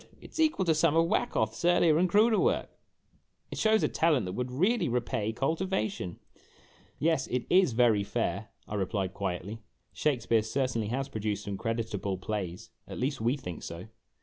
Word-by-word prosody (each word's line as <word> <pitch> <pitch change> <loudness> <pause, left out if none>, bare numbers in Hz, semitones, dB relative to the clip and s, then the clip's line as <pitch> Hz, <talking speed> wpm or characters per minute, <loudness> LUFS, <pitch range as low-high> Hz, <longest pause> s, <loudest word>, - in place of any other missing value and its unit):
It - - -14
's - - -7
equal 310 -12 +2
to 165 - +4
some 160 0 +2
of 165 0 +5
Wacoth's 110 -6 0
earlier 170 -2 +4
and 180 +1 +3
cruder 215 +4 +4
work! 470 +5 +1 0.8
It - - -5
shows 220 0 +3
a - - +4
talent 155 - +2
that 90 - -4
would 125 +4 -3
well 185 - +1
repay 115 -3 -1
cultivation! 135 - -2 0.4
" - - -28 0.3
"Yes, 160 -4 +1
it 125 -1 -2
is 185 -8 +5
very 110 -3 +4
fair," - - -2 0.2
I - - -7
replied, 95 -1 -1
quietly; 95 +2 -4 0.2
" - - -44
Shakspere 120 -6 +1
certainly 115 -1 -1
has 130 +4 -2
produced 105 -1 -3
some 100 - -4
creditable 110 -3 -2
plays 95 -2 -5 0.2
at - - -7
least, 135 -1 -2
we 120 +5 +1
think 90 - -7
so." 85 +6 -8
120 Hz, 175 wpm, -29 LUFS, 105-165 Hz, 0.8 s, of